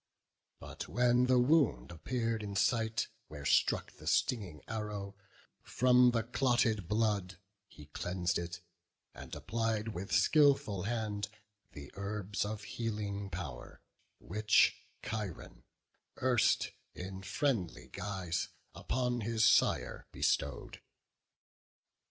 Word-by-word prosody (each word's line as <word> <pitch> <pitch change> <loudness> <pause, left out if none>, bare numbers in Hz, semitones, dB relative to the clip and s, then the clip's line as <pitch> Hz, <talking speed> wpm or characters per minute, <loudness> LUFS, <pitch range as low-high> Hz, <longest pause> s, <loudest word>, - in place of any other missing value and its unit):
But - - -7
when 125 0 +3
the 130 0 +4
wound 125 - +3
appear'd 115 +6 -2
in 100 -1 -5
sight, 110 +1 +1 0.2
where 75 -2 -9
struck - - +2
The - - -11
stinging 95 -11 0
arrow, 105 -3 -4 0.5
from 125 0 +4
the 115 -2 +1
clotted 115 -5 +1
blood 105 -4 0 0.3
He 75 - -14
cleans'd 90 +4 -2
it, 85 0 -6 0.5
and - - -9
applied 115 -1 -1
with 95 -2 -6
skilful 140 - +4
hand 105 -3 -2 0.4
The 70 -1 -10
herbs 100 0 -3
of 105 0 -5
healing 105 -3 -4
power, 85 -9 -7 0.4
which 105 +3 +3 0.3
Chiron 105 -6 -5 0.5
erst 125 -3 +2 0.2
In 95 +1 -6
friendly 100 - -1
guise 95 -3 -3 0.3
upon 125 -1 -1
his 110 0 +2
sire - - +3
bestowed. - - -1
105 Hz, 105 wpm, -33 LUFS, 95-115 Hz, 0.5 s, the